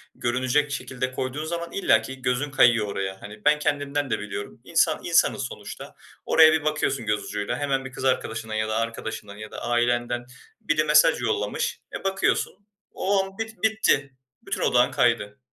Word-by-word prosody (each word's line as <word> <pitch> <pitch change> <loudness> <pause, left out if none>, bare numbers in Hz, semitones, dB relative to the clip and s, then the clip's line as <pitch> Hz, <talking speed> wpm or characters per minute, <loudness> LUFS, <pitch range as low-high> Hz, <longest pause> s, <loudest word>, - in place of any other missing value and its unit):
görünecek 130 +4 0
şekilde 130 -1 -3
koyduğun 130 +4 -3
zaman 170 +1 -4
illaki 130 -7 +1
gözün 125 +3 -1
kayıyor 120 -5 +4
oraya. 95 -1 -4
Hani, 105 +3 -11
ben 150 0 +5
kendimden 145 -1 -1
de - - 0
biliyorum. 100 -1 -7
İnsan - - +2
insanız - - +2
sonuçta. - - -8 0.3
Oraya 160 -1 +7
bir 160 - +1
bakıyorsun 140 -5 0
göz 105 -1 0
ucuyla 105 -1 -3
hemen 135 -2 -1
bir 135 - -7
kız 130 - -8
arkadaşından 115 -3 -1
ya 110 0 0
da 110 - -1
arkadaşından 110 -2 -4
ya 110 0 -9
da - - -7
ailenden 120 0 0 0.4
biri 155 0 +1
mesaj 150 -1 +5
yollamış. 105 -3 -1 0.2
E, - - -16
bakıyorsun 195 0 +1 0.4
o 195 0 +1
an 195 0 -10
bit 225 -4 -6
bitti. 220 -11 +2 0.3
Bütün - - -4
odağın - - +3
kaydı. 105 0 +1
130 Hz, 165 wpm, -25 LUFS, 110-150 Hz, 0.4 s, Oraya